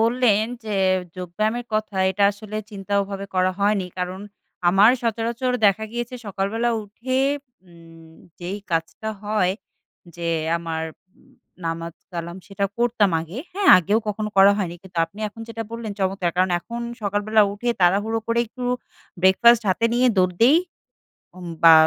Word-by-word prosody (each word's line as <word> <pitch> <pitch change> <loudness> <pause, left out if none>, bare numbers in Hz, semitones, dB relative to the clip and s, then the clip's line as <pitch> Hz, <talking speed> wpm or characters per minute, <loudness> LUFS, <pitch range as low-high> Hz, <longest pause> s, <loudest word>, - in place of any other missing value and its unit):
বললেন 230 -2 +3 0.2
যে, 215 -2 -3 0.4
যোগব্যায়ামের 215 +7 -2
কথা, 215 -2 -2
এইটা 200 +2 +2
আসলে 210 +1 -8
চিন্তা 200 -1 -7
ওভাবে 200 0 -6
করা 185 0 +3
হয়নি। 200 -2 +2
কারণ 180 +1 -3 0.5
আমার 195 +5 +6
সচরাচর 235 +2 -1
দেখা 200 +2 +2
গিয়েছে 240 +1 -4
সকালবেলা 205 +4 -1
উঠে 235 +6 -3 0.5
উম 165 -1 -16 0.3
যেই 180 +4 -4
কাজটা 165 +6 -2
হয় 210 -3 +1 0.6
যে 170 -1 -3 0.3
আমার 165 -1 -4 0.4
উ - - -24 0.5
নামাজ 165 0 -4 0.2
কালাম 170 +1 -5
সেটা 200 0 -2
করতাম 235 -4 +2
আগে। 165 +8 -7
হ্যাঁ, 390 +1 +1
আগেও 200 +5 +2
কখনো 210 +1 -2
করা 195 +1 +8
হয়নি। 175 -4 -2
কিন্তু 185 -3 -8
আপনি 165 +5 -16
এখন 215 +2 -14
যেটা 230 0 -4
বললেন 230 -2 -5
চমৎকার। 190 -2 0
কারণ 185 0 +2
এখন 235 +6 -7 0.2
সকালবেলা 205 +2 +2
উঠে 205 +4 -4
তাড়াহুড়ো 205 +5 +3
করে 230 0 +1
একটু 250 +3 -8 0.6
ব্রেকফাস্ট 230 +5 +6
হাতে 190 +5 +1
নিয়ে 250 +1 +3
দৌড় 185 -1 +3
দেই। 265 +7 +7 0.8
উম 180 - -9 0.2
বা 165 - +9
200 Hz, 150 wpm, -23 LUFS, 185-225 Hz, 0.8 s, বা